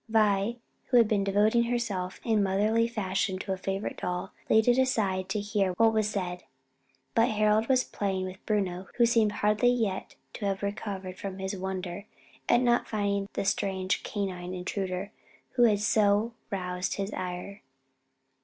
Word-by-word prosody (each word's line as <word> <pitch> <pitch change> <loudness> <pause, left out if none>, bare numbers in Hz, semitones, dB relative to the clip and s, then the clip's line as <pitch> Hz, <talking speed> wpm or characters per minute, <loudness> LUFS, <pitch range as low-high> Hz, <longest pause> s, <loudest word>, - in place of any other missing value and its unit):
Vi, 215 +1 +2 0.3
who 250 - +3
had 230 -2 +6
been 210 -2 +1
devoting 210 +4 +3
herself 215 -7 -2
in 220 -2 +3
motherly 210 +4 +2
fashion 195 -3 -1
to 190 +1 -3
a - - -4
favorite 195 +2 -3
doll, 180 +2 -3 0.2
laid 220 +1 +4
it 245 +1 +5
aside 195 -8 +1
to 210 - 0
hear 200 -2 0
what 225 +4 +4
was 215 -1 +2
said; 180 -3 -3 0.7
but 230 +1 +4
Harold 215 +1 +2
was 255 -1 +3
playing 190 -2 -2
with 185 0 -8
Bruno, 190 -3 -1
who 240 - +5
seemed 230 -3 +3
hardly 210 +3 +2
yet 225 -6 -1 0.2
to 210 - -5
have 195 0 -1
recovered 195 -2 -4
from 195 -3 -5
his 190 +1 -3
wonder 190 +1 -5 0.4
at 240 - +5
not 240 -1 +2
finding 200 -2 -1
the - - -2
strange 190 -1 0
canine 185 -3 -4
intruder 185 +1 -3 0.4
who 245 -2 +4
had 210 -3 +3
so 210 +1 +2 0.2
roused 180 -2 -2
his 200 +1 -3
ire. 185 +2 -5
200 Hz, 165 wpm, -28 LUFS, 190-220 Hz, 0.7 s, had